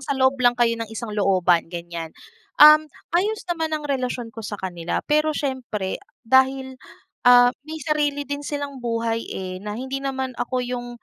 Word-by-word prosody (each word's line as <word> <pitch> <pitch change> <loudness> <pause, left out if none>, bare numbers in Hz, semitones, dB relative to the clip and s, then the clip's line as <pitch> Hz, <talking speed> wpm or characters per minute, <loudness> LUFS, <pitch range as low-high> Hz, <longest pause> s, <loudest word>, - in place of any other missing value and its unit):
sa 275 0 -3
loob 260 0 +4
lang 245 -1 +4
kayo 240 -1 +3
ng 225 - -4
isang 225 0 -6
looban, 185 -5 +2
ganyan. 170 -1 -6 0.5
Um, 305 +1 +8 0.2
ayos 420 +5 0
naman 320 -3 -1
ang 300 - -8
relasyon 250 -4 -3
ko 225 - -8
sa 210 -1 -5
kanila, 175 -3 -4
pero 305 0 +1
siyempre, 240 -9 -3 0.2
dahil, 265 +1 +2 0.5
ah, 245 0 +7 0.2
may 315 - -5
sarili 290 -2 0
din 285 0 -4
silang 285 -2 -5
buhay, 230 -1 -2
eh, 185 -1 -5
na 210 +1 -5
hindi 265 +2 -4
naman 265 -1 -3
ako 250 0 -1
yung 245 0 -4
255 Hz, 170 wpm, -23 LUFS, 220-285 Hz, 0.5 s, Um